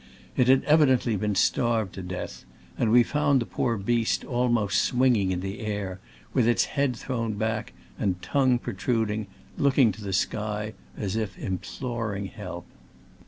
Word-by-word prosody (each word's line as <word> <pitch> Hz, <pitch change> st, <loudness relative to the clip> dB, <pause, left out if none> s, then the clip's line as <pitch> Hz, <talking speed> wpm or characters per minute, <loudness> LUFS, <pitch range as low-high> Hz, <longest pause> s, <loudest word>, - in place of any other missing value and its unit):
It 125 Hz, -, +3 dB
had 130 Hz, +1 st, +5 dB
evident 150 Hz, -5 st, +4 dB
ly 115 Hz, -3 st, +1 dB
been 105 Hz, 0 st, -1 dB
starved 115 Hz, -1 st, +1 dB
to 95 Hz, -, -6 dB
death, 90 Hz, 0 st, -6 dB, 0.3 s
and 110 Hz, -, +1 dB
we 120 Hz, +1 st, +7 dB
found 145 Hz, 0 st, +2 dB
the 120 Hz, -, -2 dB
poor 115 Hz, 0 st, -1 dB
beast 115 Hz, +3 st, 0 dB
almost 120 Hz, -5 st, +1 dB
swinging 120 Hz, -7 st, +2 dB
in 90 Hz, -1 st, -1 dB
the 95 Hz, +4 st, -5 dB
air, 100 Hz, -4 st, -3 dB, 0.3 s
with 115 Hz, -, +3 dB
its 120 Hz, -, +3 dB
head 140 Hz, -3 st, 0 dB
thrown 115 Hz, -2 st, -3 dB
back 110 Hz, -, -2 dB, 0.3 s
and 90 Hz, -2 st, 0 dB
tongue 130 Hz, +2 st, +2 dB
protruding, 110 Hz, -4 st, -1 dB, 0.3 s
looking 135 Hz, -4 st, +4 dB
to 105 Hz, +2 st, -10 dB
the 100 Hz, -, -4 dB
sky 105 Hz, +3 st, -1 dB, 0.2 s
as 100 Hz, -2 st, -2 dB
if 110 Hz, -3 st, -3 dB
imploring 110 Hz, +1 st, -4 dB
help. -, -, -7 dB
110 Hz, 160 wpm, -26 LUFS, 100-125 Hz, 0.3 s, we